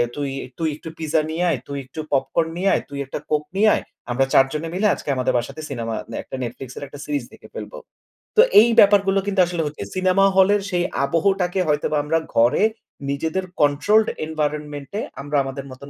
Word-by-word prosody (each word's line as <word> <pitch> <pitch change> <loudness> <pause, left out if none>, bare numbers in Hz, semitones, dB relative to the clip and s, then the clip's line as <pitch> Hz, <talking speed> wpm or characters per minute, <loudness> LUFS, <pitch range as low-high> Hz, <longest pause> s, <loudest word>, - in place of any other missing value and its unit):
"তুই 145 -1 -2 0.3
তুই 160 -1 0
একটু 160 - -9
পিজ্জা 160 0 +1
নিয়ে 165 +3 -1
আয়, 150 -7 0
তুই 140 - -5
একটু 130 +5 -10
পপকর্ন 140 +4 +1
নিয়ে 190 +2 +2
আয়, - - +1
তুই 140 0 -6
একটা 135 - -5
কোক 150 -1 +2
নিয়ে 215 +2 +5
আয়। - - -3 0.3
আমরা 135 +2 +2
৪ 135 - +7
জনে 155 +2 -3
মিলে 200 +4 +2
আজকে - - -8
আমাদের 130 -1 0
বাসাতে 140 +6 -4
সিনেমা 115 -4 -3 0.2
দে - - -6
একটা - - -8
Netflix 125 +2 -6
এর - - -6
একটা 145 +1 -11
সিরিজ 145 -3 -2
দেখে - - -14
ফেলবো।" - - -7 0.6
তো - - +10 0.2
এই 235 - +4
ব্যাপারগুলো 195 -1 +5
কিন্তু 200 -1 0
আসলে 175 -1 -2
হচ্ছে। 150 -7 -5
সিনেমা 185 +1 +3
হলের 195 +2 +5
সেই 175 -2 0 0.2
আবহটাকে 180 +5 +1
হয়তোবা 150 0 +1
আমরা 165 +2 +1 0.2
ঘরে 120 - +4 0.5
নিজেদের 160 +6 -1 0.2
controlled 205 +10 +3 0.2
environmentt 150 -2 -3
এ - - -1 0.2
আমরা 145 +1 -1
আমাদের 135 0 -6
মতন 130 +2 -11
155 Hz, 195 wpm, -22 LUFS, 140-185 Hz, 0.6 s, তো